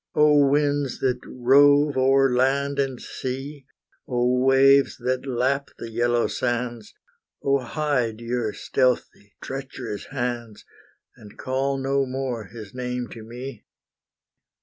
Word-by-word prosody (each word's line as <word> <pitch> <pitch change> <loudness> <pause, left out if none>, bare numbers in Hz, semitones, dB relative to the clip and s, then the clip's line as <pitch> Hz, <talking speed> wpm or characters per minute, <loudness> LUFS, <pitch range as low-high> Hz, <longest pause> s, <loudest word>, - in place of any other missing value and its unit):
Oh 150 -1 +5
winds 145 -2 +1
that 125 -1 +1
rove 145 +3 +4
o'er 135 0 +3
land 140 +2 +1
and 135 -3 -1
sea! 135 +2 -6 0.4
Oh 125 0 +1
waves 135 +1 +5
that 130 +2 -2
lap 130 +2 0
the 115 - -8
yellow 120 +1 +1
sands! 120 -3 -3 0.5
Oh 140 0 +2
hide 125 -4 -1
your 115 -1 -2
stealthy, 120 -5 -1
treacherous 130 -5 -6
hands, 120 -4 -4 0.5
And 105 -1 -15
call 135 +1 -1
no 135 0 0
more 130 -4 -3
his 105 0 -11
name 125 -1 -4
to 115 - -10
me.' 120 +1 -8
130 Hz, 120 wpm, -24 LUFS, 120-135 Hz, 0.5 s, Oh